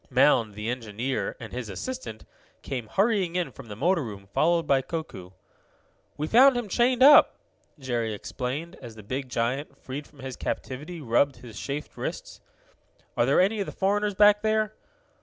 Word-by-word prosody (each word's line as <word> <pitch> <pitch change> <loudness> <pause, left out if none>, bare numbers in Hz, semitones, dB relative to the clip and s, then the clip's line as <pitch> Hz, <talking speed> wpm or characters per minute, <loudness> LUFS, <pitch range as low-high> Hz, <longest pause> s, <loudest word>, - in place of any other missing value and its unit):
Mound, 125 -5 +3
the 105 +1 -5
engineer, 120 +1 -3
and 110 -4 -9
his 120 -3 -5
assistant, 180 - -6 0.4
came 125 -5 -4
hurrying 195 - +1
in 180 -1 -1
from 135 - -12
the 105 - -7
motor 165 - +1
room, 100 -4 -8
followed 170 +1 +2
by 135 -1 +3
Koku. 135 - -6 0.9
"We 150 - -2
found 255 - +6
him 240 -3 -3
chained 245 +5 +2
up," 290 +2 +8 0.4
Jerry 120 -5 -2
explained, 130 - -5
as 120 -4 -10
the 110 - -11
big 130 +5 -4
giant, 130 +4 -2
freed 140 +3 -7
from 145 -3 -17
his 130 -1 -6
captivity, 150 +6 -5
rubbed 135 +2 +2
his 120 -3 -11
chafed 145 +2 -5
wrists. - - -6 0.7
"Are - - +2
there - - +4
any 200 +4 +2
of 200 - -2
the - - -5
foreigners 205 +1 0
back 205 +1 +6
there?' 215 0 +1
140 Hz, 170 wpm, -26 LUFS, 120-195 Hz, 0.9 s, up